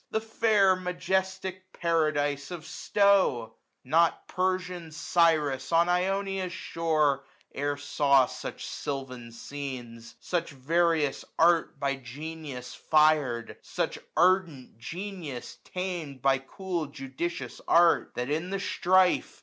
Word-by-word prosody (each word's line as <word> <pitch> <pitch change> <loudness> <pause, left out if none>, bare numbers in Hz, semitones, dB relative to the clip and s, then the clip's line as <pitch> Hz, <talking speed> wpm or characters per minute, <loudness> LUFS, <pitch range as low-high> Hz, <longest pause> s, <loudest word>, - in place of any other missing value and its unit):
The 220 - 0
fair 215 -3 +3
majestic 185 +1 -2
paradise 150 -4 0
of 175 -3 -7
Stowe! 180 - +2 0.3
1040 130 - -19
Not 165 +1 +3
Persian 180 -2 -2
Cyrus 155 -5 +1
on 170 +1 +4
Ionia's 190 +1 0
shore 155 -6 0 0.3
E'er 145 +1 -1
saw 140 -2 +3
such - - -7
silvan 130 -4 -5
scenes; 120 -3 -7
such 170 -2 -2
various 155 +1 +1
art 165 -3 +3
By 140 0 0
genius 135 -1 -7
fir'd, 150 -7 +2
such - - -3 0.2
ardent 170 - +2
genius 170 - -7
tam'd 175 -8 -5
By 135 -1 +4
cool 175 +3 -4
judicious 140 +5 -5
art; 170 0 +4
that, 125 +3 -3
in 160 +4 -1
the 195 0 -2
strife. 185 -1 +2
160 Hz, 110 wpm, -28 LUFS, 140-180 Hz, 0.3 s, on